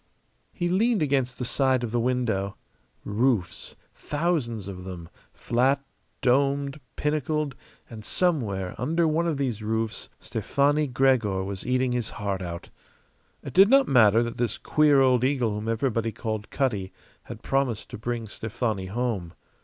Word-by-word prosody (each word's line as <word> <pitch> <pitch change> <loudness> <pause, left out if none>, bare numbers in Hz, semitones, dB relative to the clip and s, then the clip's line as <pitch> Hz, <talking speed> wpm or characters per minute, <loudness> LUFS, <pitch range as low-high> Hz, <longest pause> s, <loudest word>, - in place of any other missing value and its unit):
He 175 - -2
leaned 210 +2 +2
against 135 -4 0
the 125 - -3
side 130 0 +1
of 115 - -3
the 120 - +1
window. 115 -5 -1 0.5
Roofs, 110 -4 0 0.2
thousands 145 - -2
of 90 -2 -7
them, 90 -3 -8 0.2
flat, 135 +3 +1 0.4
domed, 140 +2 +2 0.2
pinnacled; 150 -1 -1 0.3
and 110 -2 -10
somewhere 110 - -1
under 165 +7 +1
one 165 +2 +1
of 160 -4 0
these 125 -6 -2
roofs 110 +1 -2
Stefani 145 +2 +1
Gregor 125 -7 +2
was 95 -1 -6
eating 130 0 +1
his 120 -3 -1
heart 100 -2 -3
out. 85 -1 -6 0.7
It - - -7
did 195 +2 +7
not 275 +1 +5
matter 115 -3 +5
that 120 0 -5
this 120 -1 -1
queer 150 -3 +4
old 130 -2 +4
eagle 130 -4 +1
whom 105 +2 -4
everybody 115 -1 0
called 110 -1 -4
Cutty 105 -9 -1 0.3
had - - -9
promised 135 -5 -1
to - - -6
bring 120 0 -3
Stefani 110 -2 -3
home. 105 -5 -3
125 Hz, 145 wpm, -26 LUFS, 110-140 Hz, 0.7 s, did